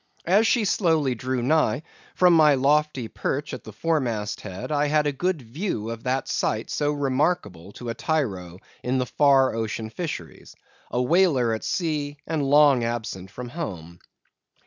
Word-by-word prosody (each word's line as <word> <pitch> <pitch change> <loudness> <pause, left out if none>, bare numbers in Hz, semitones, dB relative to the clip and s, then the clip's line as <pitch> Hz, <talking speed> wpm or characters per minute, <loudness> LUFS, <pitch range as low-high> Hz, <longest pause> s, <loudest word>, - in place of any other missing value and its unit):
As 205 +6 +4
she 230 -3 +2
slowly 160 - +2
drew 125 +1 -3
nigh, 150 -1 +2 0.3
from 180 -1 +5
my 155 -3 +6
lofty 140 -2 +1
perch 145 +6 -3
at - - -6
the - - -9
fore 165 -1 0
mast 110 -5 -3
head, 95 +9 -7
I 145 0 +2
had 150 0 +2
a 145 - +1
good 165 +1 -2
view 115 - -4
of 115 +1 -8
that 130 +1 -1
sight 110 +1 -1
so 145 0 0
remarkable 135 - -1
to 120 - -7
a - - -1
tyro 100 - -2 0.2
in 125 +1 -1
the 125 - 0
far 135 -1 +3
ocean 110 0 -3
fisheries—a 125 - -7
whaler 130 -4 +3
at 110 - -4
sea, 150 -5 -2
and 160 -2 -1
long 140 -2 +5
absent 110 -5 -4
from 120 +3 -8
home. 90 - -6
135 Hz, 165 wpm, -24 LUFS, 115-155 Hz, 0.3 s, my